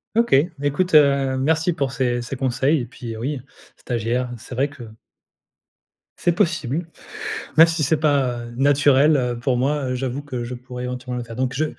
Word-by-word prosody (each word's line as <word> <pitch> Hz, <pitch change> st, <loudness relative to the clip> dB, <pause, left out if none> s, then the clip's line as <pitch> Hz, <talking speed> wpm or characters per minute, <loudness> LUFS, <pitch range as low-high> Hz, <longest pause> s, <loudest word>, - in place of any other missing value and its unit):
OK, 230 Hz, -8 st, +4 dB, 0.3 s
écoute, 145 Hz, +6 st, 0 dB
heu, 140 Hz, -3 st, +4 dB
merci 160 Hz, +5 st, +1 dB
pour 140 Hz, -5 st, -2 dB
ces 125 Hz, -2 st, 0 dB
ces 120 Hz, +3 st, -5 dB
conseils 135 Hz, +3 st, +1 dB
et -, -, -4 dB
puis, 120 Hz, -1 st, -8 dB
heu, -, -, -8 dB
oui, 135 Hz, +3 st, -3 dB, 0.4 s
stagiaire, 120 Hz, +1 st, -2 dB
c'est 120 Hz, +3 st, -11 dB
vrai 135 Hz, +3 st, +1 dB
que 140 Hz, -4 st, -11 dB, 1.3 s
c'est 175 Hz, -, +2 dB
possible, 170 Hz, -, 0 dB, 0.7 s
même 165 Hz, +1 st, +9 dB
si 165 Hz, -1 st, -1 dB
c'est 155 Hz, +3 st, +2 dB
pas 135 Hz, -6 st, +1 dB
naturel, 145 Hz, +2 st, +4 dB
heu, 125 Hz, -2 st, -1 dB
pour 125 Hz, +1 st, 0 dB
moi, 140 Hz, +3 st, 0 dB
heu, -, -, -1 dB
j'avoue 130 Hz, +2 st, -3 dB
que 130 Hz, -4 st, -5 dB
je 125 Hz, +1 st, -5 dB
pourrais 125 Hz, 0 st, -7 dB
éventuellement 125 Hz, 0 st, -5 dB
le 120 Hz, -, -3 dB
faire, 115 Hz, -1 st, -9 dB
donc 130 Hz, +1 st, -1 dB
je 155 Hz, +4 st, 0 dB
130 Hz, 185 wpm, -22 LUFS, 125-145 Hz, 1.3 s, même